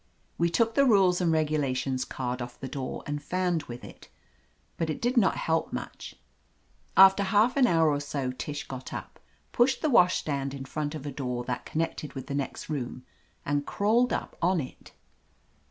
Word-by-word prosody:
We 170 0 +3
took 225 +5 +2
the 280 - +4
rules 195 -8 +4
and 170 -2 +2
regulations 135 -5 0
card 125 -1 -4
off 120 0 -7
the 135 - -5
door 130 -1 -5
and 145 0 -3
fanned 180 -2 0
with 120 0 -8
it, - - -12 0.7
but 165 -1 -2
it 155 - -2
did 245 +2 0
not 225 -6 +4
help 160 0 0
much. - - -6 0.8
After 195 +1 +8
half 205 +5 +3
an 270 -3 +5
hour 165 -5 +4
or 145 - 0
so 140 -2 -3
Tish 145 +3 -5
got 130 -1 -7
up, - - -7 0.3
pushed 255 +6 +2
the 310 - +2
washstand 145 - +2
in 135 -1 -7
front 150 +2 -3
of 150 -2 -7
a 145 - -3
door 125 -3 -3
that 125 0 -4
connected 155 -2 -3
with 135 - -6
the - - -5
next 140 -1 -3
room 130 -4 -4 0.4
and 145 0 -1
crawled 230 +5 +2
up - - -3
on 180 +1 +3
it. 130 -4 -8
155 Hz, 185 wpm, -28 LUFS, 135-190 Hz, 0.8 s, After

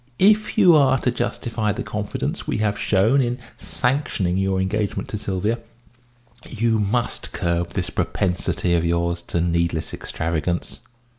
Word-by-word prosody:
If 210 +3 +3
you 180 -6 +7
are 135 -3 +5
to 125 - 0
justify 115 -3 -2
the 100 - -3
confidence 105 -1 -4
we - - 0
have 105 -1 0
shown 110 +8 +3
in 120 -1 -1 0.2
sanctioning 125 -9 -1
your 95 0 +1
engagement 100 +2 -1
to 105 - -3
Sylvia, 105 +4 -1 0.9
you 115 -1 +1
must 110 +3 -1
curb 85 0 -1
this - - -2
propensity 90 -1 0
of 85 -1 +2
yours 85 0 0
to 85 - -2
needless 85 -1 0
extravagance." 80 +1 -3
100 Hz, 140 wpm, -22 LUFS, 85-120 Hz, 0.9 s, you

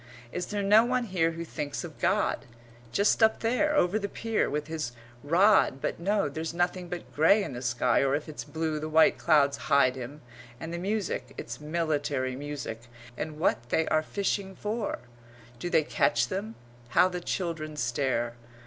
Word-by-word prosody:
Is 180 0 -3
there 205 -1 -2
no 210 +3 +6
one 250 +1 0
here 175 -6 0
who 165 +1 -5
thinks 145 -3 -4
of - - -9
God? - - +1 0.5
just 205 - +2
up 220 0 +4
there, 300 +7 +1
over 195 -3 +3
the 200 -1 -3
pier, 225 +1 -1
with 150 +1 -2
his 155 -5 -4 0.3
rod 170 - +4
but - - -3
no 200 +2 +1
there's 160 +3 -5
nothing 175 0 -1
but 170 -8 -7
grey 165 +9 +5
in 140 - -5
the 120 - -6
sky 120 -1 +2
or 135 0 +2
if 150 - -4
it's 155 - -6
blue 160 -1 -2
the 155 +1 -4
white 160 +1 +5
clouds 140 -2 +3
hide 140 -3 +4
him, 135 +4 -8 0.4
and 165 +3 -6
the 170 - -3
music 190 - -2
it's 120 +4 -7
military 150 -5 -1
music 140 -5 -6 0.3
and 150 +3 -5
what 120 -6 0
they 160 +4 +1
are 155 - +3
fishing 195 +2 -2
for? 215 +1 -3 0.6
Do 175 - -3
they 160 - +3
catch 120 -4 +1
them? 210 +4 -4 0.3
How 150 - +5
the 180 -1 -4
children 165 -4 -3
stare! 125 -2 0
160 Hz, 180 wpm, -28 LUFS, 140-195 Hz, 0.6 s, no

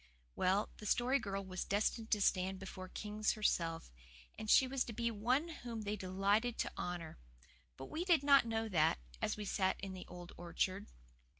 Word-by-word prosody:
Well, 195 +3 +2
the 210 - -7
Story 250 +6 +3
Girl 195 -3 -3
was 185 -1 -3
destined 220 +2 0
to 210 - +2
stand 190 0 +2
before 185 -1 -8
kings 210 +2 -1
herself, 165 - 0 0.4
and 215 - -6
she 260 - +7
was 260 0 0
to 230 - -6
be 235 +1 0
one 250 +10 +1
whom 240 -8 -6
they 210 0 -1
delighted 200 +5 +1
to - - -1
honour. 175 - -5 0.6
But 135 - -7
we 320 - -3
did 340 -6 +4
not 280 -4 +6
know 225 0 -1
that, 160 -6 +3 0.2
as - - 0
we 210 - -4
sat 190 -1 +1
in 195 -1 -5
the 185 - -8
old 175 0 -9
orchard. 185 +3 -2
205 Hz, 185 wpm, -36 LUFS, 185-235 Hz, 0.6 s, she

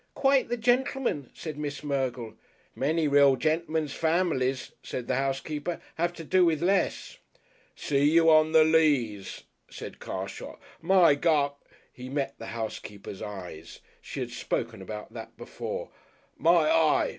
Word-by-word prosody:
"Quite 275 -2 +3
the 240 - -1
gentleman," 245 - 0
said 155 -3 -7
Miss 145 -1 -4
Mergle. 130 -5 -2 0.4
"Many 155 +3 0
real 140 -1 +5
gentlemen's 155 0 -1
families," 160 -6 0
said 125 - -6
the - - 0
housekeeper, 145 +5 -2
"have 170 +1 0
to 170 - -9
do 185 +4 +3
with 165 -3 +2
less." 190 +1 0 0.6
"See 145 0 +2
you 165 +1 +4
on 155 0 +5
the 160 -1 +7
Leas," 145 -11 +1 0.3
said - - -9
Carshot. - - -6 0.2
"My 175 -2 +5
gu 145 -1 +2 0.2
!" - - -30
He 125 0 -9
met 140 0 -2
the 115 - -7
housekeeper's 105 -3 -6
eye. 95 -6 -7 0.4
She - - -6
had - - -4
spoken - - -3
about 105 +2 -8
that - - -9
before. - - -6 0.4
"My 165 0 +4
eye!" 155 -1 +3
150 Hz, 145 wpm, -27 LUFS, 130-165 Hz, 0.6 s, the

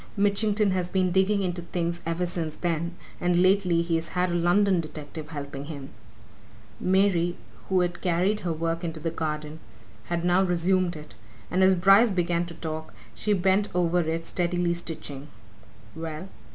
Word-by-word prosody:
Mitchington 205 0 +2
has 180 -1 -1
been 185 -1 +1
digging 195 +2 +2
into 175 -1 -2
things 170 0 -3
ever 165 +2 0
since 165 -3 -3
then, 170 0 -2 0.2
and 175 0 +2
lately 185 -3 +3
he's 165 -1 -1
had 180 0 +2
a - - -1
London 175 +2 +3
detective 155 0 -8
helping 140 -2 -6
him." 140 -3 -7 0.9
Mary, 185 -2 +2 0.3
who 190 -1 +3
had 175 -1 -2
carried 185 +4 +1
her 175 - -2
work 165 +1 -2
into 165 -2 -4
the 165 +1 -2
garden, 155 -1 -4 0.5
had 170 0 -2
now 180 +1 +4
resumed 180 0 +1
it, 150 0 -10 0.4
and 185 - +2
as 190 0 +6
Bryce 195 +6 +6
began 175 -2 0
to 170 - -9
talk 160 -1 -6 0.2
she 215 - -2
bent 195 +2 +2
over 175 0 +2
it 165 0 -1
steadily 175 0 0
stitching. 150 -5 -5 0.7
"Well?" 160 +3 -6
175 Hz, 160 wpm, -26 LUFS, 165-185 Hz, 0.9 s, as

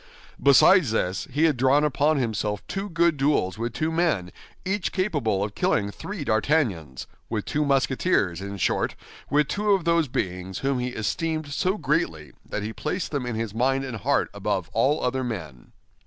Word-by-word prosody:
Besides 145 +3 +6
this, 100 -4 -1
he 145 +4 0
had 155 -5 +3
drawn 135 +4 +4
upon 150 +1 +2
himself 105 -5 -2
two 195 +1 -4
good 170 -2 +2
duels 135 -9 +1
with 120 +1 -2
two 155 +4 -1
men, 155 - 0 0.3
each 190 0 -1
capable 145 - 0
of 105 0 -4
killing 100 -1 0
three 195 - -6
D'Artagnans—with 110 - -1
two 150 - 0
Musketeers, 135 - +1
in 100 +1 -6
short, - - 0 0.3
with 150 0 +3
two 205 +4 +1
of 190 -4 0
those 170 -2 +3
beings 90 -5 -3
whom 135 -2 +1
he 125 - -1
esteemed 150 - -2
so 185 +6 0
greatly 130 - -1
that 105 - -4
he 110 +2 -4
placed 175 +9 -3
them 140 -5 -2
in 120 - -3
his 110 -2 -3
mind 135 +4 +1
and 130 -4 -5
heart 100 - 0
above - - -2
all 145 +3 +2
other 130 +1 0
men. 80 - -6
135 Hz, 170 wpm, -25 LUFS, 105-155 Hz, 0.3 s, Besides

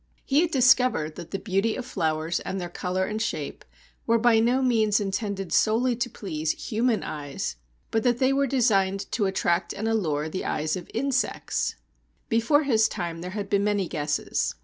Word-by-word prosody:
He 280 +3 +3
had 345 - +1
discovered 250 - +3
that 170 - -8
the 195 - -3
beauty 195 +3 0
of 255 - -5
flowers 160 -6 -1
and 190 - -4
their 175 -1 -5
colour 185 +1 -1
and 215 +2 -3
shape 225 - -3 0.4
were 230 0 +4
by 230 -1 +4
no 245 +4 +2
means 220 -4 +3
intended 195 -1 -3
solely 235 +3 +3
to 245 0 -1
please 160 -8 -3 0.2
human 230 0 +1
eyes, 145 - -4 0.4
but 225 - +1
that 245 -1 +2
they 260 +1 +3
were 275 0 +2
designed 195 -7 +2
to 205 -4 +1
attract 180 -2 0
and 220 - -3
allure 160 -10 0
the 170 +4 -4
eyes 155 +1 -1
of 180 -2 -7
insects. 260 +2 -1 0.5
Before 230 +7 +3
his 220 -5 +3
time 170 -4 -4
there 180 - -5
had 200 -1 -3
been 200 0 +1
many 205 -3 +1
guesses. 150 -3 -1
210 Hz, 180 wpm, -26 LUFS, 180-240 Hz, 0.5 s, were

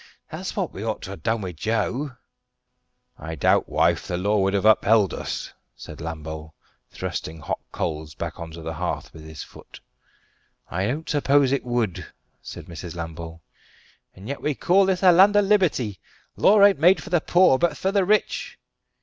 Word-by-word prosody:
That's - - -5
what - - -2
we - - -6
ought - - -3
to - - -7
ha' - - -9
done 110 +6 0
wi' 95 -2 -4
Joe." 115 - -2 1.0
"I 80 0 -6
doubt, 70 - +2
wife, - - +1
the 90 - -2
law 100 +3 +1
wouldn't 95 +1 +1
have 110 -1 +7
upheld 105 -2 +3
us," - - -5 0.2
said - - -11
Lambole, 80 -1 -7 0.3
thrusting 80 +1 -5
hot 75 - -3
coals 75 -1 -4
back - - -6
on 85 -1 -6
to 85 0 -9
the 80 0 -4
hearth 85 +2 -4
with 80 0 -12
his 80 0 -8
foot. - - -15 0.9
"I 95 +3 -1
don't 150 +7 -3
suppose 140 -2 +3
it 140 - 0
would," 120 -7 -2 0.3
said - - -9
Mrs. 85 0 -8
Lambole. 80 -1 -7 0.7
"And 95 +3 -11
yet 140 +2 -5
we 150 -2 -1
call 190 +6 +3
this 190 0 0
a 185 - +8
land 195 +4 +6
of 205 -1 +4
liberty! 165 - +1 0.4
Law 205 0 +5
ain't 200 -5 +4
made 175 +2 +4
for 195 - -10
the 175 -3 +3
poor, 175 -7 +4
but 175 - +1
for 190 - -1
the 200 -1 +2
rich." 210 +3 0
110 Hz, 185 wpm, -24 LUFS, -, 1.0 s, a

